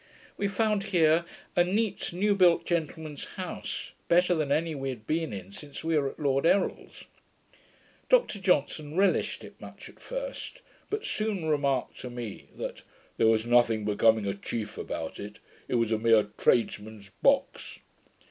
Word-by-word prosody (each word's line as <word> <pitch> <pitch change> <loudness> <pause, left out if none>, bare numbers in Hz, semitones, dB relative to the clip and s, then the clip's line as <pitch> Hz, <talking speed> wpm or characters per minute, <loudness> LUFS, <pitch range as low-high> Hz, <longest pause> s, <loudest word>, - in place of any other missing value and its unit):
We 200 - -1
found 205 0 +1
here 170 -3 +3 0.3
a 175 - +5
neat 200 +3 -1
new 200 +4 +2
built 180 -4 +4
gentleman's 160 -3 -3
house, 185 -2 -5 0.2
better 180 +1 +4
than 155 -4 -1
any 160 +2 +1
we 135 -2 -3
had 115 -4 -7
been 160 0 -1
in 95 -2 -7
since 145 +8 -9
we 165 0 +1
were 140 -2 +2
at - - -13
Lord 140 -2 +1
Errol's. 190 +4 0 1.1
Dr - - +3
Johnson 155 -4 0
relished 195 +1 +2
it - - -13
much - - -10
at - - -18
first, - - -6 0.3
but 425 +2 -3
soon 215 -6 -2
remarked 140 -4 0
to 125 - -6
me, 120 -4 -7
that - - -5 0.4
'there 115 - +4
was 110 0 +3
nothing 120 -3 +3
becoming 110 +1 +3
a 100 - 0
chief 105 +2 -5
about 80 -1 -5
it: 105 +1 -8 0.3
it - - -1
was 115 -2 +1
a 110 - +1
mere 115 -1 +5
tradesman's 105 -3 0
box.' - - +1
150 Hz, 160 wpm, -28 LUFS, 115-180 Hz, 1.1 s, a